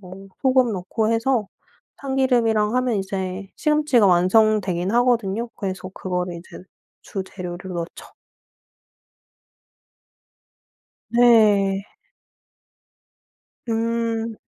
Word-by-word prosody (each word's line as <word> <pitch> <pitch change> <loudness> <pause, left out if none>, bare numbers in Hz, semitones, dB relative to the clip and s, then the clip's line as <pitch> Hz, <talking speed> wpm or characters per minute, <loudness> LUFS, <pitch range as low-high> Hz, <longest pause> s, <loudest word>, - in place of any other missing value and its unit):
뭐 195 +1 -12
소금 255 -3 +3
넣고 215 +4 -1
해서 230 -2 0 0.5
참기름이랑 245 -5 +1
하면 250 -3 +1
이제 190 0 -4
시금치가 300 -8 +3
완성되긴 185 0 +2
하거든요. 235 -2 +1
그래서 185 -2 -5
그거를 180 -1 -3
이제 170 - -12 0.4
주재료를 185 -1 -7
넣죠. 170 -1 -7 3.0
네. 210 -5 +4 1.8
음. 230 0 -1
215 Hz, 180 characters per minute, -22 LUFS, 190-235 Hz, 3.0 s, 네